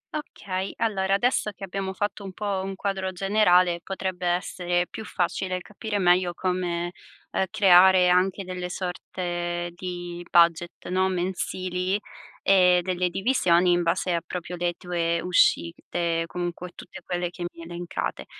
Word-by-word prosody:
Okay. 195 -10 -4
Allora, 195 -3 +1
adesso 240 0 +1
che 195 - -12
abbiamo 195 0 -3
fatto 205 +1 -3
un 190 -1 -7
po' 200 -1 -2
un 195 0 -4
quadro 190 -1 -2
generale, 180 -2 +3
potrebbe 185 -2 -3
essere 175 0 0
più 220 - -8
facile 185 -1 -2
capire 210 +2 -4
meglio 180 -1 +3
come, 175 -2 -1 0.4
uhm, 190 - +1
creare 185 -1 +6
anche 185 +2 +2
delle 180 -1 -5
sorte 175 -1 -3
di 175 -1 -6
budget, 170 0 +3
no, 185 +1 +2
mensili, 185 +1 -2 0.4
e 180 -2 +5
delle 180 0 0
divisioni 180 -4 +3
in 175 0 +3
base 175 +1 0
a 170 - 0
proprio 180 0 -6
le 175 0 -1
tue 170 -1 -1
uscite, 170 -1 +1
comunque 175 0 -5
tutte - - -11
quelle 175 -1 -2
che 175 0 -7
mi 170 - -12
hai - - -9
elencate. 175 0 -4
180 Hz, 145 wpm, -25 LUFS, 175-190 Hz, 0.4 s, creare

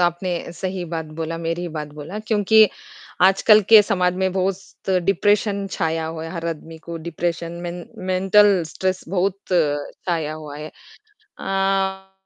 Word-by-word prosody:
आपने 175 0 -1
सही 185 +1 -4
बात 160 -1 -4
बोला, 165 0 -3
मेरी 165 +1 -2
ही 175 - -3
बात 155 -2 -5
बोला। 155 +7 -7
क्योंकि 215 0 +4 0.5
आजकल 195 +3 +6
के 220 -2 +10
समाज 180 -3 +1
में 190 0 0
बहुत 190 +1 -3
डिप्रेशन 200 +1 +2
छाया 160 -1 -1
हुआ 160 0 -5
है, 165 - -6
हर 170 -2 -4
आदमी 160 0 -7
को 170 +1 -7
डिप्रेशन, 170 0 -3
मेन 175 0 -5
मेंटल 190 +1 +4
स्ट्रेस 185 +3 -2
बहुत 190 +1 0 0.2
छाया 155 0 -1
हुआ 150 -2 -8
है। 150 +1 -7 0.5
अ, 195 - -2
180 Hz, 145 wpm, -22 LUFS, 165-195 Hz, 0.5 s, के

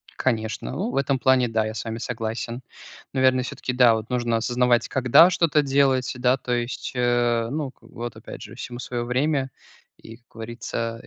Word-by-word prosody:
Конечно, 110 -4 -2
ну, 205 +6 -2
в - - -5
этом 135 -1 +1
плане 130 -1 +4
да, 110 -1 0
я 110 - -4
с - - -5
вами 115 0 -4
согласен. 115 +1 -4 0.5
Наверное, 130 -1 +3
всё-таки 125 0 -4
да, 125 -2 +6
вот 110 0 -5
нужно 120 -2 0
осознавать, 120 +1 +2
когда 130 +7 +6
что-то 160 -4 +2
делать, 135 -2 +2
да, 125 +1 +2
то 125 -1 -3
есть, 120 +1 -3
э, 120 -2 +1
ну, 145 -3 -3
вот 120 -1 -7
опять - - -10
же, - - -10
всему 120 0 -7
своё 120 -1 -4
время 135 +2 0 0.5
и, 115 - -12
как 120 - -36
говорится, 115 0 -5
125 Hz, 180 wpm, -24 LUFS, 115-130 Hz, 0.5 s, да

